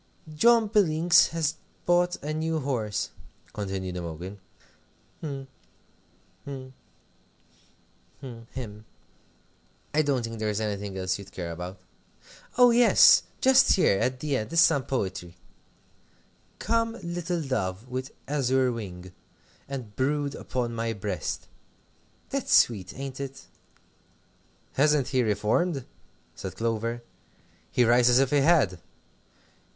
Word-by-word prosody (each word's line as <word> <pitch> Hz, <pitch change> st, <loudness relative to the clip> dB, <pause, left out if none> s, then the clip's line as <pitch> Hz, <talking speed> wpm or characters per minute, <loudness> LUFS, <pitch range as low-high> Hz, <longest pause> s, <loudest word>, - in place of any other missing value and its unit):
"John 230 Hz, +8 st, +5 dB
Billings 175 Hz, -5 st, +4 dB
has 160 Hz, -2 st, -1 dB, 0.3 s
bought 175 Hz, 0 st, +3 dB
a 150 Hz, +1 st, -3 dB
new 160 Hz, +1 st, -1 dB
horse," 110 Hz, -7 st, -2 dB, 0.4 s
continued 95 Hz, -3 st, -4 dB
Imogen; 90 Hz, +4 st, -6 dB, 0.8 s
"hm, 140 Hz, -4 st, -5 dB, 1.0 s
hm, 130 Hz, -2 st, -8 dB, 1.5 s
hm 120 Hz, -4 st, -10 dB
him. 110 Hz, -4 st, -8 dB, 1.1 s
I 155 Hz, -, +4 dB
don't 140 Hz, -5 st, 0 dB
think 115 Hz, -1 st, -5 dB
there 110 Hz, 0 st, -1 dB
is 105 Hz, 0 st, -1 dB
anything 100 Hz, -2 st, -3 dB
else 95 Hz, +1 st, -1 dB
you'd 100 Hz, 0 st, -11 dB
care 85 Hz, -4 st, -5 dB
about. 90 Hz, +3 st, -7 dB, 0.8 s
Oh, 245 Hz, -1 st, +7 dB
yes! 240 Hz, 0 st, +7 dB, 0.2 s
just 265 Hz, 0 st, +6 dB
here, 100 Hz, -, +3 dB
at 130 Hz, 0 st, 0 dB
the 145 Hz, -3 st, 0 dB
end, 110 Hz, -, -5 dB
is 165 Hz, -, +2 dB
some 155 Hz, -6 st, +4 dB
poetry: 95 Hz, -8 st, -3 dB, 1.2 s
"'Come, 230 Hz, 0 st, 0 dB
little 175 Hz, -1 st, -3 dB
dove, 110 Hz, -5 st, -3 dB
with 130 Hz, +2 st, -5 dB, 0.2 s
azure 130 Hz, -2 st, +1 dB
wing, 95 Hz, -6 st, -7 dB, 0.6 s
And 125 Hz, -7 st, -6 dB
brood 145 Hz, +1 st, 0 dB
upon 125 Hz, -4 st, -3 dB
my 115 Hz, 0 st, -2 dB
breast,' 105 Hz, -1 st, -4 dB, 0.8 s
"That's -, -, -2 dB
sweet, 100 Hz, -5 st, +2 dB
ain't 135 Hz, -1 st, -6 dB
it?" 135 Hz, -1 st, -7 dB, 1.3 s
"Hasn't 145 Hz, -2 st, +2 dB
he 130 Hz, -2 st, +2 dB
reformed?" 120 Hz, -, 0 dB, 0.5 s
said -, -, -7 dB
Clover; 115 Hz, +1 st, -2 dB, 0.7 s
"he 125 Hz, -, +3 dB
writes 120 Hz, +1 st, +5 dB
as 120 Hz, -, +5 dB
if 135 Hz, 0 st, +3 dB
he 145 Hz, -, +4 dB
had." 140 Hz, -, +3 dB
130 Hz, 120 wpm, -27 LUFS, 105-150 Hz, 1.5 s, Oh